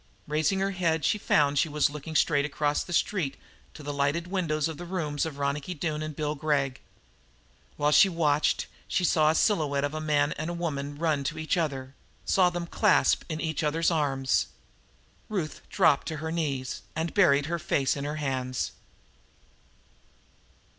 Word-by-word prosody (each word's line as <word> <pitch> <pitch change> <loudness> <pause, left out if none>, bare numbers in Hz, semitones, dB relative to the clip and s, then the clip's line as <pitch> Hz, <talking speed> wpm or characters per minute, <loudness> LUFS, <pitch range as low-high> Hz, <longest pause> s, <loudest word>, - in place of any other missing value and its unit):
Raising 155 +6 +1
her 195 0 +1
head 165 -4 0
she 210 - +2
found 145 -6 +2
she 160 - +2
was 150 -1 +1
looking 150 +2 -7
straight 145 -3 +3
across 150 0 0
the - - -10
street 170 -4 0 0.4
to 150 - -10
the 145 0 -4
lighted 145 +4 0
windows 165 -5 -1
of 160 -2 -6
the 175 - -7
rooms 160 -4 -2
of 145 -3 -7
Ronicky 140 +5 -2
Doone 155 -1 -2
and 155 -1 -5
Bill 150 0 -1
Gregg. 140 -3 -1 1.0
While 150 0 +2
she 195 +5 +7
watched 155 -4 +1 0.2
she 185 - 0
saw 155 -3 +4
the 160 - +2
silhouette 150 -9 +2
of 145 +1 -1
a 155 - -3
man 150 -1 +2
and 170 +3 -3
woman 145 -4 -3
running 155 -3 0
to 160 +3 -2
each 155 +2 0
other, 135 -6 -2 0.3
saw 185 -2 +4
them 175 -1 -4
clasped 210 +3 +3
in 155 -1 -3
each 160 -2 -2
other's 160 +3 +1
arms. 135 - +1 0.8
Ruth 180 -8 -3
dropped 160 -7 +3
to 160 - -3
her 160 +2 -4
knees 140 -6 -2
and 160 +1 -2
buried 145 -8 +4
her 170 +2 -2
face 140 -4 +1
in 140 - -4
her 145 +1 -3
hands. 130 -4 -2
155 Hz, 175 wpm, -27 LUFS, 145-165 Hz, 1.0 s, she